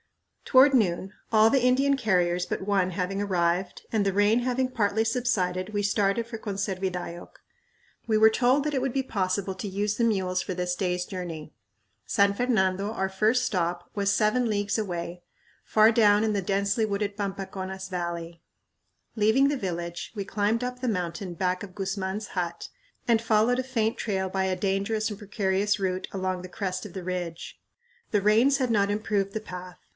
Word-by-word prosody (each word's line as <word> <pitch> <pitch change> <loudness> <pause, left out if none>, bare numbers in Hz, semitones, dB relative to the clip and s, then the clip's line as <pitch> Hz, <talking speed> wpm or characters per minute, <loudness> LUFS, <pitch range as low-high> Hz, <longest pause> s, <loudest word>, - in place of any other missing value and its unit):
Toward 270 +1 +6
noon, 190 -4 +1 0.2
all 220 0 +6
the 270 +2 +3
Indian 270 +3 +3
carriers 180 -7 +1
but - - -3
one 195 -2 +1
having 185 +2 -2
arrived, 180 -1 0
and 215 -3 +1
the 195 - +2
rain 205 +4 +3
having 255 +1 0
partly 220 -3 0
subsided, 210 -7 0
we 205 -1 -1
started 205 +2 +1
for 235 -1 -6
Conservidayoc. 190 -4 -4 0.8
We 220 -1 +3
were 220 +1 +6
told 255 +5 +3
that 300 0 -2
it 265 - 0
would 270 0 0
be 270 +2 0
possible 190 -4 -1
to 195 +2 -5
use 205 +2 -1
the 235 - 0
mules 190 -5 +1
for 185 - -4
this 180 0 -2
day's 180 -1 -1
journey. 165 -5 -6 0.5
San 200 0 +3
Fernando, 200 -4 +1
our 190 -4 -1
first 215 +6 +2
stop, 175 -2 -2
was 200 -1 +1
"seven 225 +3 +2
leagues" 205 0 0
away, 175 -4 -4 0.4
far 215 +1 +5
down 210 -2 +4
in 215 - +1
the 200 - 0
densely 200 +3 0
wooded 200 -1 -1
Pampaconas 190 -1 -5
Valley. 170 -2 -4 0.7
Leaving 220 +6 +4
the 290 - 0
village 175 -7 -4
we 200 -2 -3
climbed 210 +4 0
up 250 0 -5
the 255 - -1
mountain 180 -2 -3
back 180 +2 -1
of 185 -2 -10
Guzman's 195 +1 -3
hut 175 -2 -3 0.4
and 230 -2 +3
followed 230 +2 +2
a - - 0
faint 230 -4 -1
trail 190 -3 -1
by 190 0 0
a 190 -1 0
dangerous 200 +3 0
and 205 - -7
precarious 205 -1 0
route 185 -1 -2
along 185 -1 -2
the 185 - -9
crest 185 -1 -3
of 205 - -8
the 190 - -6
ridge. 175 -2 -5 0.5
The 210 - +2
rains 225 +7 +4
had 255 -3 0
not 200 -2 +2
improved 205 -2 -1
the 220 - -2
path. 180 -3 -9
200 Hz, 180 wpm, -27 LUFS, 185-220 Hz, 0.8 s, Toward